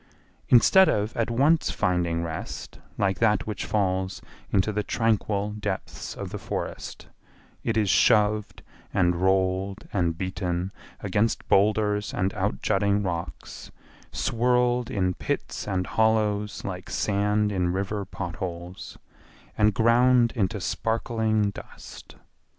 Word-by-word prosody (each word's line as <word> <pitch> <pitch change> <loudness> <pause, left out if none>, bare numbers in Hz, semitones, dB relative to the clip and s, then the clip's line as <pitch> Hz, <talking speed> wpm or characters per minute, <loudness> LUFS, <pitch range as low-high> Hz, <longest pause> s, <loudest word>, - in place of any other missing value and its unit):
Instead 190 +10 +6
of 105 +2 -1
at 115 0 0
once 140 +7 +3
finding 85 -2 0
rest 80 -1 -6 0.2
like 95 -2 0
that 105 -3 +2
which 105 -2 -4
falls 95 -2 -1 0.3
into 100 +2 +2
the 105 - 0
tranquil 105 -2 0
depths 105 -2 -5
of - - -6
the - - -5
forest, - - -5 0.6
it 115 -1 0
is 105 -2 +2
shoved 105 +1 +3 0.3
and 90 -1 +2
rolled 95 +2 0
and 85 -4 0
beaten 95 0 -2 0.3
against 105 +3 0
boulders 105 +1 +2
and 95 +3 0
out 100 -1 -2
jutting 100 0 +2
rocks, 85 -3 -5 0.4
swirled 125 0 +1
in 95 -2 0
pits - - -4
and 95 -3 -1
hollows 105 -1 +1
like 90 -1 -6
sand 105 +1 +1
in 90 -3 0
river 100 +2 -2
pot 90 -3 -6
holes, 90 -1 -6 0.6
and 105 -1 +3
ground 120 +1 +4
into 105 -1 0
sparkling 110 +2 0
dust. - - -12
105 Hz, 120 wpm, -26 LUFS, 95-110 Hz, 0.6 s, Instead